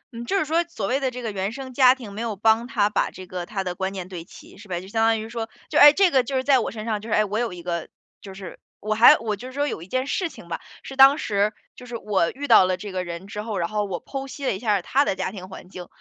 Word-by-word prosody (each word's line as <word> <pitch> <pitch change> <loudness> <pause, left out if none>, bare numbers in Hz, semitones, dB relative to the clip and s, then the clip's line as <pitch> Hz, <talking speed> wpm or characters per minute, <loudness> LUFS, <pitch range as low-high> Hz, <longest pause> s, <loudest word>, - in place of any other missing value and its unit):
嗯， 235 +1 -6
就 395 - 0
是 380 - +1
说 325 +3 +1
所 220 -12 -4
谓 255 +7 0
的 270 -2 0
这 250 0 -8
个 225 - -2
原 195 0 -2
生 260 +1 -8
家 255 0 +6
庭， 230 -6 -10
没 210 - -5
有 230 -3 -3
帮 220 +3 +2
他 210 -5 +2
把 210 - 0
这 185 - -11
个 180 -1 -6
他 195 -3 -3
的 180 -1 -3
观 190 +2 -3
念 185 -2 -6
对 180 -3 -7
齐， 175 - -15
是 205 - -14
吧？ 175 -2 -3
就 185 - -11
相 225 +2 0
当 225 0 +3
于 220 - -6
说， 230 -1 -5 0.2
就 - - +2
哎， 295 - +11
这 375 +3 +3
个 260 -2 +4
就 265 +3 -4
是 260 - +1
在 270 -1 +4
我 - - -2
身 215 -1 -7
上， 215 -3 -2
就 225 - -9
是， - - -1
哎， 215 - +3
我 210 +2 -2
有 235 -3 -1
一 175 -1 -9
个 170 -2 -3 0.3
就 195 -1 -10
是 190 -2 -9 0.2
我 215 +1 -1
还 220 +3 +8
我 220 -2 -3
就 245 +6 -9
是 260 - -10
说 290 +1 0
有 160 - -4
一 170 - -10
件 255 +6 -1
事 340 +5 -1
情 - - -13
吧， - - -4 0.2
是 270 - -8
当 270 +2 +8
时， 205 -5 0 0.2
就 250 - -12
是 240 -1 -5
我 200 -6 0
遇 290 +2 -6
到 185 - +7
了 185 0 0
这 205 +1 -7
个 185 -1 -2
人 170 +1 -7
之 210 +1 -6
后， 215 -2 -4
然 170 -2 0
后 210 +1 -1
我 185 -3 -6
剖 270 -1 -5
析 275 +1 -7
了 - - +1
一 - - -7
下 210 -5 +1
他 275 +8 +2
的 195 - -1
家 190 - -3
庭 185 -2 -9
环 190 - -11
境， 180 -2 -9
215 Hz, 345 characters per minute, -24 LUFS, 190-255 Hz, 0.3 s, 哎